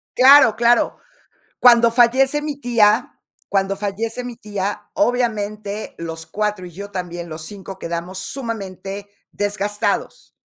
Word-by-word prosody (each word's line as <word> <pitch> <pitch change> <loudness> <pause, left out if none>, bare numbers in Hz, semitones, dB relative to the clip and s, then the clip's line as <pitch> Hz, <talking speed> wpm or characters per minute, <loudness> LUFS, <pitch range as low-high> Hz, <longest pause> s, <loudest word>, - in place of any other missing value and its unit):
Claro, 260 -3 +7
claro. 235 +1 +3 0.6
Cuando 235 -1 +6
fallece 260 +5 +3
mi 295 -2 -4
tía 230 -5 +2 0.4
cuando 195 0 +1
fallece 210 +4 -3
mi 245 -1 -7
tía, 205 -2 -4
obviamente 215 -6 -1
los 165 -1 -7
4, 210 -3 -2
y - - -12
yo 200 +4 -9
también, 175 -2 -5
los 155 0 -7
5 195 +1 -9
quedamos 170 +3 -5
sumamente 200 -4 -6 0.2
desgastados. 205 0 -2
205 Hz, 120 wpm, -20 LUFS, 195-235 Hz, 0.6 s, Claro